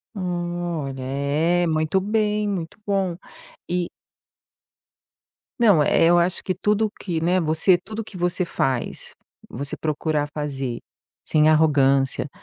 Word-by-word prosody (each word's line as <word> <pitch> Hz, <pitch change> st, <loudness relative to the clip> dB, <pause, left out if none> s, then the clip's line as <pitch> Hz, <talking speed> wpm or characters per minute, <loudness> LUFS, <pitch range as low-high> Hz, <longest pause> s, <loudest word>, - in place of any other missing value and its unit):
Hum. 175 Hz, -2 st, -2 dB, 0.3 s
Olha, 135 Hz, -2 st, -5 dB
é, 150 Hz, +6 st, +1 dB
muito 155 Hz, +3 st, +1 dB
bem, 210 Hz, +1 st, 0 dB
muito 180 Hz, -4 st, -4 dB
bom. 195 Hz, -4 st, 0 dB, 0.5 s
E 175 Hz, 0 st, -1 dB, 1.7 s
Não, 195 Hz, -10 st, +6 dB
eh, -, -, +3 dB
eu 175 Hz, +1 st, +5 dB
acho 175 Hz, +1 st, +1 dB
que 185 Hz, -, -2 dB
tudo 210 Hz, +1 st, +1 dB
o 215 Hz, -, -2 dB
que 180 Hz, -5 st, -4 dB
né, 175 Hz, +3 st, +2 dB
você 160 Hz, +3 st, +4 dB
tudo 215 Hz, +5 st, -8 dB
o -, -, -2 dB
que 205 Hz, -, -13 dB
você 180 Hz, +1 st, 0 dB
faz, 130 Hz, -6 st, -2 dB, 0.4 s
você 140 Hz, +3 st, -5 dB
procurar 155 Hz, -1 st, -1 dB
fazer 135 Hz, -5 st, -3 dB, 0.5 s
sem 155 Hz, 0 st, +4 dB
arrogância, 140 Hz, -3 st, +3 dB
170 Hz, 135 wpm, -23 LUFS, 150-185 Hz, 1.7 s, Não